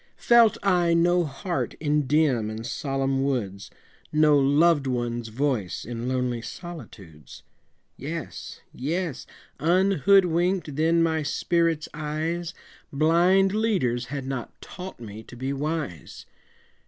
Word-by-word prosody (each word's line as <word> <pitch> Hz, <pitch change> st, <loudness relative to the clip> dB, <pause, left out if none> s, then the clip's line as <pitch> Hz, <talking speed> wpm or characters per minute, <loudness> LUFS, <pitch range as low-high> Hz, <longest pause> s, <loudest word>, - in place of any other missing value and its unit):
Felt 235 Hz, -2 st, +5 dB
I 175 Hz, -4 st, +3 dB
no 175 Hz, +1 st, +3 dB
heart 150 Hz, +5 st, -3 dB
in 150 Hz, -2 st, 0 dB
dim 135 Hz, -7 st, +2 dB
and 110 Hz, +1 st, -6 dB
solemn 135 Hz, -1 st, -1 dB
woods 105 Hz, -8 st, -2 dB, 0.4 s
No 150 Hz, -1 st, +4 dB
loved 145 Hz, +1 st, +3 dB
one's 120 Hz, -2 st, -2 dB
voice 115 Hz, -5 st, -2 dB
in 120 Hz, +1 st, -5 dB
lonely 125 Hz, -2 st, -1 dB
solitudes? 105 Hz, -, -10 dB, 0.5 s
Yes, 160 Hz, +3 st, -7 dB
yes! 155 Hz, -1 st, -3 dB, 0.3 s
unhoodwinked 180 Hz, -1 st, +2 dB
then 165 Hz, +2 st, +3 dB
my 160 Hz, -1 st, +1 dB
spirit's 165 Hz, +1 st, 0 dB
eyes, 155 Hz, +3 st, -3 dB, 0.4 s
Blind 175 Hz, +6 st, +3 dB
leaders 185 Hz, -, 0 dB
had 135 Hz, +1 st, -5 dB
not 130 Hz, -3 st, -6 dB
taught 185 Hz, -4 st, -9 dB
me 110 Hz, -2 st, -9 dB
to 115 Hz, -, -13 dB
be 130 Hz, +3 st, -3 dB
wise. 150 Hz, -, -4 dB
150 Hz, 115 wpm, -25 LUFS, 125-170 Hz, 0.5 s, Felt